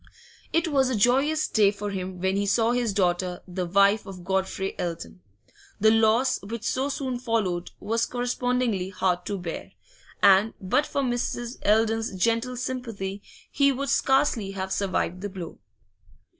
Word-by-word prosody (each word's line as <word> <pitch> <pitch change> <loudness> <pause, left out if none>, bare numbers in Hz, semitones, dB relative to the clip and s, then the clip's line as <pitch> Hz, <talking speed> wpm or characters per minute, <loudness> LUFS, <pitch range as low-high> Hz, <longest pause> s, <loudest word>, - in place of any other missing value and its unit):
It 330 0 +1
was 270 -4 +2
a 255 - 0
joyous 270 +8 +2
day 210 -3 +4
for 205 0 -4
him 185 -1 -5
when 190 +1 0
he 200 0 0
saw 225 +3 +3
his 245 -2 0
daughter 180 -2 0
the 180 0 -3
wife 200 +3 +3
of 185 -2 -9
Godfrey 190 +1 -1
Eldon. 170 +1 -5 0.6
The 220 +2 +5
loss 225 +4 +3
which 220 +3 -6
so 265 +4 0
soon 260 -3 -3
followed 210 -8 -1
was 230 +2 0
correspondingly 245 -5 -1
hard 185 -2 -1
to 200 - -2
bear, 175 -3 -6 0.5
and 200 +3 +5
but 210 +11 +1
for 280 - -1
Mrs. 240 0 -2
Eldon's 225 0 +2
gentle 230 +5 0
sympathy 225 -6 -4 0.3
he 280 -1 +3
would 275 +1 -3
scarcely 265 -7 +2
have 190 -1 -3
survived 185 -2 -1
the 205 - -4
blow. 185 -4 -8
215 Hz, 155 wpm, -26 LUFS, 190-245 Hz, 0.6 s, The